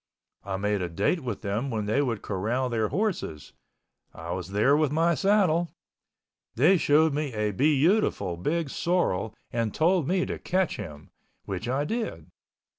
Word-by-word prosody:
I 95 -1 -3
made 105 0 0
a 90 - -2
date 100 - 0
with 125 -8 -5
them 105 +7 -2
when 110 -4 -2
they 110 +7 +1
would 120 -7 -2
corral 115 +7 -1
their 110 -2 0
horses. 180 - -3 0.6
I 80 +1 -7
was 90 +1 -4
there 110 +8 +3
with 150 -2 +2
my 165 +3 +3
saddle. 180 -3 +2 0.8
They 160 +11 +5
showed 155 -1 +3
me 145 -3 -2
a 105 0 0
beautiful 145 - +2
big 150 - -2
sorrel 115 - 0 0.2
and 115 -3 -1
told 170 -2 +2
me 180 +1 +1
to - - -5
catch 185 -1 0
him, 75 -8 -9 0.3
which 100 +4 -4
I 135 +3 0
did. 150 - -4
130 Hz, 160 wpm, -27 LUFS, 100-165 Hz, 0.8 s, They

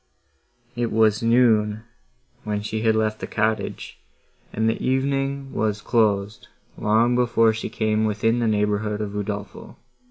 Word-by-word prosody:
It 120 -1 -2
was 110 0 +3
noon 110 -3 +3 0.6
when 105 -1 -3
she 110 +1 -3
had 110 -1 +2
left 110 -1 0
the - - -5
cottage, 110 -1 -2 0.5
and 110 +1 0
the 115 - -1
evening 135 +1 -1
was 105 -1 -1
closed, 105 -3 0 0.3
long 115 +3 +2
before 115 -2 +3
she 110 - -5
came 110 0 0
within 110 +2 +1
the 115 - +1
neighbourhood 105 0 0
of 105 -1 -3
Udolpho. 105 0 -6
110 Hz, 135 wpm, -23 LUFS, 105-115 Hz, 0.6 s, was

